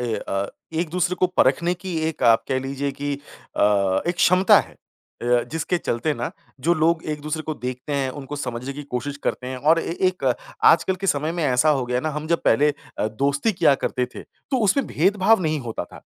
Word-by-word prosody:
ए 120 -2 -1
अ, 100 -1 -2 0.3
एक-दूसरे 175 +2 0
को 185 - +5
परख़ने 170 +7 +3
की 180 -1 -6
एक 160 - -6
आप 115 -2 +5
कह 130 - +1
लीजिए 135 +1 -3
कि 145 0 -1 0.4
अ, 100 -2 +2
एक 175 - +1
क्षमता 180 +2 +5
है। - - -12 0.5
अ, 120 0 +3
जिसके 165 +2 -1
चलते 120 +1 -1
ना 120 -1 -3 0.3
जो 165 +6 +2
लोग 160 +1 +2
एक-दूसरे 155 +1 -3
को 155 - -4
देखते 125 +3 -5
हैं 135 -2 0
उनको 145 +2 -7
समझने 125 -1 -4
की 145 +2 -7
कोशिश 140 +1 -4
करते 125 - -2
हैं 130 0 -4
और 155 +5 +3
ए 165 - -4
एक 180 -6 -6 0.4
आजकल 190 +3 +5
के 195 - 0
समय 150 0 +1
में 170 -1 -2
ऐसा 130 +2 +3
हो 135 -4 +1
गया 125 - -1
है 125 - -1
ना 155 - -1
हम 150 +1 -5
जब 170 0 +1
पहले 145 +6 +4 0.3
अ, - - +1
दोस्ती 140 - 0
किया 170 -6 +4
करते 125 -1 -2
थे, - - -7
तो 265 - -6
उसमें 255 +6 +2
भेदभाव 195 +5 +3
नहीं 155 -2 0
होता 115 -7 -4
था। - - -14
145 Hz, 210 wpm, -23 LUFS, 125-170 Hz, 0.5 s, को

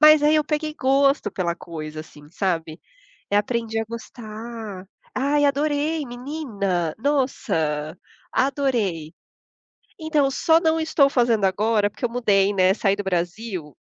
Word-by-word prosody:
Mas 305 -1 +8
aí 300 +1 +5
eu 305 - +2
peguei 305 0 -2
gosto 275 -3 +3
pela 175 -3 -1
coisa, 155 -2 -7
assim, 150 -1 -14
sabe. 165 -3 -2 0.5
Eh, 205 - +1
aprendi 225 +1 -1
a - - 0
gostar. 220 -3 -8 0.3
Ai, 290 +2 +2
adorei. 295 +2 0
Menina, 240 - -3
nossa, 165 - -1 0.4
adorei! 235 - 0 0.9
Então, 310 -3 +2
só 320 +4 +4
não 325 -1 +2
estou 315 -3 +3
fazendo 235 -6 +2
agora, 210 +2 +2
porque 255 - -17
eu - - -1
mudei, 205 -5 +2
né, 185 -1 +4
saí 195 -1 +1
do 205 - -4
Brasil, 180 - -3
225 Hz, 135 wpm, -23 LUFS, 185-280 Hz, 0.9 s, Mas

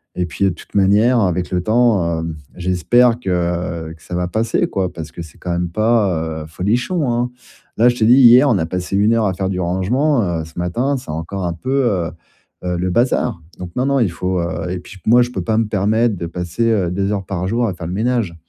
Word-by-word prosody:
et 90 - -1
puis 95 +3 0
toute - - -15
manière 105 +5 +4
avec 90 -2 0
le 90 -1 0
temps, 105 -7 +2
heu, 80 -1 -4 0.2
j'espère 115 +7 +2
que, 110 - -5 0.6
heu, 80 - -8
que 80 - -22
ça - - -9
va 90 0 -1
passer 110 +5 0
quoi, 95 -2 -2
parce 80 -2 -7
que 85 - -8
c'est 80 - -15
quand 90 - -6
même 85 0 -1
pas, 90 -6 0
heu, - - -10
folichon, 120 - -1
hein. 120 +1 -1 0.5
Là, 120 +2 +5
je 120 - -1
t'ai 110 - +2
dit 120 - +6
hier, 125 +2 +7
on 110 - +3
a 80 - -1
passé 90 +2 -3
une 105 +3 +3
heure 115 -1 +2
à 95 - 0
faire 95 +1 -2
du 95 - -2
rangement, 115 - +1
heu, 85 -4 -2
ce 80 +2 -10
matin, 120 +11 0
c'est 125 - -11
encore 80 +5 -4
un 85 - -1
peu, 130 +10 -1
heu 90 -6 -1 0.5
heu 90 -1 -1
le 90 +1 -1
bazar. 120 -2 +1 0.2
Donc, 90 -1 -7
non, 125 - 0
non, 140 -1 +2
il 105 -7 +2
faut, 90 +1 -2
heu, 85 +1 -3
et 90 - -2
puis - - -14
ch 95 - -15
moi, 120 +3 +6
je 120 - -5
peux - - -3
pas 110 -1 0
me 115 - +2
permettre 105 +3 +1
de 85 - -4
passer, 90 +6 -3
heu, 95 -6 +1
2 100 +2 -1
heures 100 -2 -3
par 90 -1 -3
jour, 120 +4 0
à 100 - -2
faire 85 -2 -7
le 90 - -4
ménage. 115 -4 0
95 Hz, 245 wpm, -18 LUFS, 90-120 Hz, 0.6 s, hier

